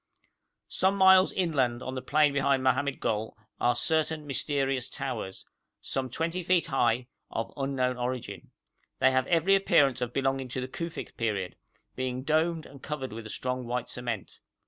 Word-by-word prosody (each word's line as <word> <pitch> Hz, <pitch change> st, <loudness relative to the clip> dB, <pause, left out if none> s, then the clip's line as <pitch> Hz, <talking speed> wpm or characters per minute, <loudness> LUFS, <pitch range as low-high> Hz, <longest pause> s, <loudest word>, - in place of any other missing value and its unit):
Some 190 Hz, +1 st, +1 dB
miles 190 Hz, 0 st, +7 dB
inland 130 Hz, -9 st, 0 dB
on 130 Hz, -, -4 dB
the 130 Hz, -, -4 dB
plain 150 Hz, +1 st, +3 dB
behind 140 Hz, -1 st, +2 dB
Mohammed 135 Hz, +1 st, +1 dB
Gol 110 Hz, 0 st, -2 dB, 0.2 s
are 120 Hz, 0 st, +3 dB
certain 160 Hz, -1 st, +1 dB
mysterious 135 Hz, -2 st, -1 dB
towers, 125 Hz, -9 st, -5 dB, 0.3 s
some 130 Hz, -1 st, -2 dB
20 165 Hz, +7 st, -2 dB
feet 180 Hz, 0 st, +2 dB
high, 120 Hz, -2 st, +1 dB, 0.2 s
of 115 Hz, 0 st, -4 dB
unknown 135 Hz, -2 st, -1 dB
origin. 125 Hz, 0 st, -4 dB, 0.5 s
They 130 Hz, -, +4 dB
have 130 Hz, 0 st, +1 dB
every 175 Hz, +3 st, +3 dB
appearance 145 Hz, -10 st, +4 dB
of 125 Hz, -1 st, -1 dB
belonging 135 Hz, 0 st, 0 dB
to 125 Hz, +1 st, -4 dB
the 130 Hz, -, -3 dB
Kufic 165 Hz, +5 st, -6 dB
period, 100 Hz, -5 st, -1 dB, 0.4 s
being 130 Hz, 0 st, -3 dB
domed 160 Hz, +2 st, +1 dB
and 140 Hz, -1 st, -13 dB
covered 140 Hz, -5 st, -4 dB
with 110 Hz, 0 st, -7 dB
a -, -, -10 dB
strong 125 Hz, +1 st, -3 dB
white 125 Hz, 0 st, -2 dB
cement. 120 Hz, -5 st, -4 dB
130 Hz, 160 wpm, -28 LUFS, 125-155 Hz, 0.5 s, miles